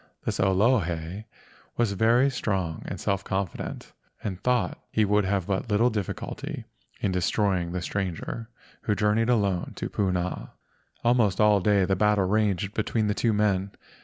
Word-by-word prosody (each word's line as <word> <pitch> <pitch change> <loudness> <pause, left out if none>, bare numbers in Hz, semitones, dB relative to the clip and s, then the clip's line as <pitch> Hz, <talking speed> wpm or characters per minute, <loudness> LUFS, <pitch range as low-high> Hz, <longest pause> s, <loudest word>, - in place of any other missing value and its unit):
This - - -2
Olohe 95 -2 +1 0.5
was 120 -3 +2
very 115 +7 +3
strong 95 -10 -2
and - - -5
self 100 0 -1
confident, 95 -4 -4 0.3
and 95 -3 -4
thought 125 -1 +1
he 110 - +2
would 105 0 +2
have 95 -2 0
but 100 +4 -2
little 115 +4 +3
difficulty 105 -4 -4 0.4
in 100 - +1
destroying 90 -1 +1
this 90 0 -3
stranger 100 +4 -4 0.3
who 105 - 0
jour¬ 105 +1 +2
neyed 115 +2 +1
alone 100 -7 +1
through - - -4
Puna. 90 -3 -2 0.5
Almost 120 -6 +3
all 105 -1 +5
day 100 0 +3
the 95 - +1
battle 105 0 +3
raged 100 -1 +1
between 110 0 0
the 105 - +1
two 115 +2 +1
men. 100 -2 +1
100 Hz, 155 wpm, -26 LUFS, 95-110 Hz, 0.5 s, all